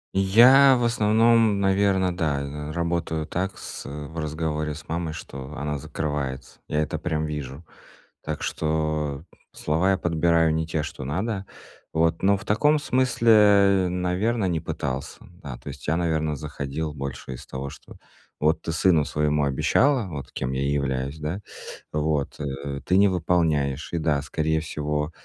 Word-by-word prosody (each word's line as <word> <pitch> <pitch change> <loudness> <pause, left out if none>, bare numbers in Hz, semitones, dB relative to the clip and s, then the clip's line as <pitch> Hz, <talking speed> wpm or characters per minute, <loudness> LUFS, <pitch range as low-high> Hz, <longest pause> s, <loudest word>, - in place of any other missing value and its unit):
Я, 125 +8 +7
в 120 - -1
основном, 115 -1 +3
наверно, 95 -2 +2
да, 75 -5 0
э, 75 +2 -6
работаю 85 -1 -1
так 95 +4 -3
с - - -8
в 75 +3 -7
разговоре 75 -1 -2
с 80 - -12
мамой, 80 -1 -2
что 70 -1 -8
она 75 +1 -3
закрывается. 75 -3 -4
Я 75 0 0
это - - -4
прям 80 -3 -1
вижу. 75 0 -6 0.6
Так - - -4
что 75 -2 -1 0.3
слова 80 +6 +1
я 95 - +2
подбираю 85 -1 +2
не 80 0 -1
те, 80 -2 -1
что 70 -3 -6
надо, 95 - -2 0.5
вот. 80 +1 +1
Но 100 +1 +4
в 105 - -10
таком 150 +9 +3
смысле, 105 -8 +4
наверно, 90 +5 0
не 85 -4 0
пытался, 65 -2 -4 0.3
да. 65 -4 -6
То - - -11
есть - - -9
я, 80 - +2
наверно, 80 -3 0
заходил 75 +1 -4
больше 70 -2 -6
из 60 - -9
того, 65 +1 -5
что - - -14 0.4
вот 80 +1 +2
ты - - -5
сыну 85 -3 +3
своему 75 -1 +1
обещала, 115 - +2
вот 70 -5 -7
кем 65 0 -3
я 65 - -1
и 70 - 0
являюсь, 70 0 -2
да, 80 +6 -4 0.5
вот, 75 -2 -1
э, 70 -1 -5
ты 90 +1 +3
не 100 0 +6
выполняешь. 80 -5 0
И - - +1
да, 75 -3 +1
скорее 80 +2 -1
всего, 75 -1 -2
80 Hz, 160 wpm, -25 LUFS, 75-95 Hz, 0.6 s, Я